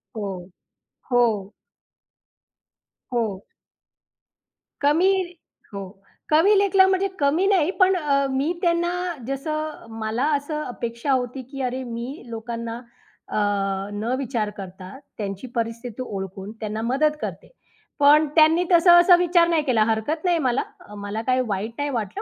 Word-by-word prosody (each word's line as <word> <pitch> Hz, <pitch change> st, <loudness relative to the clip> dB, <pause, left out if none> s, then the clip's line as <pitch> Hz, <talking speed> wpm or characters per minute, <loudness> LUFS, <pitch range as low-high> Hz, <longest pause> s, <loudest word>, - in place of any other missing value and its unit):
हो. 195 Hz, -4 st, -5 dB, 0.6 s
हो. 220 Hz, -5 st, +2 dB, 1.6 s
हो. 215 Hz, -5 st, -1 dB, 1.4 s
कमी 320 Hz, +7 st, +4 dB, 0.6 s
हो, 200 Hz, 0 st, -4 dB, 0.5 s
कमी 325 Hz, +7 st, +5 dB
लेखलं 390 Hz, -1 st, +5 dB
म्हणजे 380 Hz, +1 st, +2 dB
कमी 300 Hz, +6 st, +2 dB
नाही 370 Hz, -4 st, +3 dB
पण 375 Hz, 0 st, +5 dB
अ, 285 Hz, -5 st, +1 dB
मी 270 Hz, +4 st, 0 dB
त्यांना 345 Hz, 0 st, +1 dB, 0.4 s
जसं 305 Hz, +2 st, -4 dB
मला 220 Hz, +4 st, -1 dB
असं 300 Hz, +2 st, -3 dB
अपेक्षा 235 Hz, +1 st, -4 dB
होती 255 Hz, 0 st, -1 dB
की 275 Hz, -1 st, -5 dB
अरे, 255 Hz, 0 st, -2 dB
मी 240 Hz, +4 st, -6 dB
लोकांना 230 Hz, 0 st, -5 dB, 0.5 s
अ, -, -, -6 dB, 0.6 s
न 220 Hz, +4 st, -2 dB
विचार 235 Hz, -5 st, -2 dB
करता, 190 Hz, +2 st, -9 dB, 0.2 s
त्यांची 200 Hz, +3 st, -5 dB
परिस्थिती 230 Hz, +1 st, -3 dB
ओळखून 195 Hz, -3 st, -6 dB
त्यांना 215 Hz, 0 st, -4 dB
मदत 275 Hz, +6 st, +1 dB
करते, -, -, -6 dB, 0.5 s
पण 295 Hz, +2 st, +6 dB
त्यांनी 320 Hz, +2 st, +5 dB
तसं 345 Hz, 0 st, +7 dB
असा 350 Hz, +1 st, +7 dB
विचार 345 Hz, -1 st, +3 dB
नाही 330 Hz, -3 st, +2 dB
केला. 245 Hz, -6 st, +3 dB
हरकत 225 Hz, +9 st, -1 dB
नाही 350 Hz, -1 st, +3 dB
मला. 255 Hz, -3 st, +1 dB, 0.2 s
अ, 210 Hz, -, -14 dB
मला 205 Hz, +2 st, -3 dB
काही 255 Hz, 0 st, +3 dB
वाईट 205 Hz, +2 st, -2 dB
नाही 290 Hz, 0 st, -1 dB
वाटलं. 220 Hz, -7 st, -3 dB
260 Hz, 130 wpm, -23 LUFS, 220-310 Hz, 1.6 s, तसं